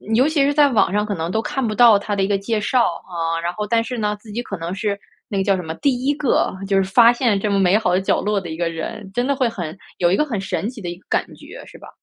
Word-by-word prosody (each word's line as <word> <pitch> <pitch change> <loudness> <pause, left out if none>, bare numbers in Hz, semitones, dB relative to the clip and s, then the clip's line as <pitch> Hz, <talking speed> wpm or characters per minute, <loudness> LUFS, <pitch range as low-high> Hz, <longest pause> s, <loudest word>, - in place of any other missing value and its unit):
尤 255 +5 +4
其 305 -3 +2
是 285 +1 +2
在 290 -1 +5
网 225 -7 +2
上 210 0 +1
可 210 - -3
能 165 -2 -3
都 220 - 0
看 265 +2 -2
不 215 - -2
到 230 -4 +7
它 205 0 -3
的 195 - 0
一 - - +1
个 200 -1 +1
介 215 +3 -2
绍， 245 +4 +2
啊， 165 -3 -3
然 170 - -1
后 210 +1 -4
但 230 +1 +2
是 245 +2 -5
呢， 210 -2 -1
自 215 0 -13
己 235 +4 -3
可 200 -5 -6
能 170 +2 -5
是， 200 +1 -2 0.3
那 210 -6 -3
个 195 - +1
叫 195 0 +2
什 - - -3
么， 160 -2 -5
第 260 - 0
1 285 - +3
个 285 -3 +1
就 195 0 +2
是 195 - +3
发 230 +5 +6
现 235 -4 +1
这 205 +1 -1
么 200 - +2
美 190 +1 +4
好 200 -5 0
的 180 - +3
角 190 - +1
落 210 0 0
的 180 -3 -8
一 160 - -5
个 170 -1 0
人， 190 +4 -6
真 245 +3 0
的 280 - +1
会 260 -2 +1
很 175 -5 -6 0.2
有 175 - +2
一 - - +4
个 300 - +2
很 235 -9 -3
神 190 +1 -3
奇 245 -3 -10
的 175 - -4
一 175 - -6
个 185 - -25
感 - - +1
觉， - - -12
是 - - -14
吧？ - - -13
205 Hz, 340 characters per minute, -20 LUFS, 185-240 Hz, 0.3 s, 到